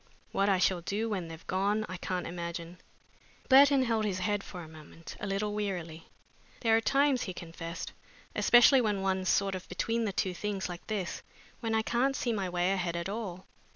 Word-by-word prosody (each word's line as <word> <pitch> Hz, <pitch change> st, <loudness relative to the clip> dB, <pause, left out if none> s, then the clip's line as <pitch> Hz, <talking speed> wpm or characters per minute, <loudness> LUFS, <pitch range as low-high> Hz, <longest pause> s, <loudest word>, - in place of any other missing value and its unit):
"What 200 Hz, +1 st, +2 dB
I 195 Hz, -, +4 dB
shall 185 Hz, -1 st, +2 dB
do 210 Hz, +6 st, -2 dB
when 185 Hz, -5 st, -2 dB
they've 165 Hz, 0 st, -10 dB
gone 200 Hz, +3 st, 0 dB
I 185 Hz, -, -5 dB
can't 180 Hz, 0 st, -3 dB
imagine." 170 Hz, 0 st, -6 dB, 0.7 s
Burton 275 Hz, 0 st, +7 dB
held 225 Hz, -3 st, +1 dB
his 200 Hz, -3 st, -1 dB
head 205 Hz, +2 st, -1 dB
for 180 Hz, -, -8 dB
a -, -, -10 dB
moment 160 Hz, +1 st, -11 dB
a 205 Hz, -, -4 dB
little 205 Hz, +1 st, -1 dB
wearily. 175 Hz, -6 st, -4 dB, 0.5 s
"There 225 Hz, -2 st, +4 dB
are 225 Hz, -, +3 dB
times," 275 Hz, +1 st, +3 dB
he 185 Hz, -, -4 dB
confessed, 165 Hz, 0 st, -6 dB, 0.4 s
"especially 245 Hz, +2 st, +6 dB
when 205 Hz, -4 st, 0 dB
one's 190 Hz, -1 st, 0 dB
sort 195 Hz, -1 st, +2 dB
of 185 Hz, -1 st, -6 dB
between 225 Hz, +5 st, -1 dB
the 205 Hz, -, -1 dB
two 185 Hz, -1 st, -1 dB
things 200 Hz, +1 st, -3 dB
like 175 Hz, -1 st, -8 dB
this, 200 Hz, -5 st, -3 dB, 0.4 s
when 225 Hz, -2 st, -1 dB
I 220 Hz, -, +2 dB
can't 260 Hz, +4 st, +1 dB
see 240 Hz, -3 st, -1 dB
my 195 Hz, -4 st, -2 dB
way 175 Hz, +1 st, +1 dB
ahead 180 Hz, -3 st, -1 dB
at 170 Hz, +2 st, -3 dB
all. 195 Hz, -4 st, -5 dB
195 Hz, 195 wpm, -30 LUFS, 180-220 Hz, 0.7 s, Burton